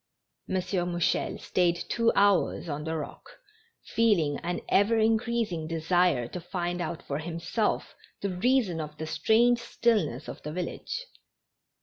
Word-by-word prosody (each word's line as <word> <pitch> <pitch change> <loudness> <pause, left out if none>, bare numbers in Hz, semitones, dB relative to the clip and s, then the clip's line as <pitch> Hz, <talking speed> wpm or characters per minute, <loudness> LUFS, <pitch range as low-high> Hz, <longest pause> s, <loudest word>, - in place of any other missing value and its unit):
M. - - -1
Mouchel 180 -2 0
stayed 175 -2 +1
two 230 +6 +1
hours 200 -3 +3
on 150 0 -4
the 160 0 -2
rock, 145 -2 -8 0.5
feeling 180 -11 +2
an 175 +1 -3
ever 215 +3 +3
increasing 220 -6 +1
desire 165 -5 +2
to 180 - -6
find 175 0 -3
out 170 -1 -4
for 140 +1 -3
himself 170 +6 -2 0.2
the 200 - -2
reason 220 -5 +2
of 150 0 -7
the 160 - -4
strange 220 +10 +3
stillness 205 - 0
of - - -7
the 150 - -5
village. 185 - -4
175 Hz, 135 wpm, -28 LUFS, 160-220 Hz, 0.5 s, hours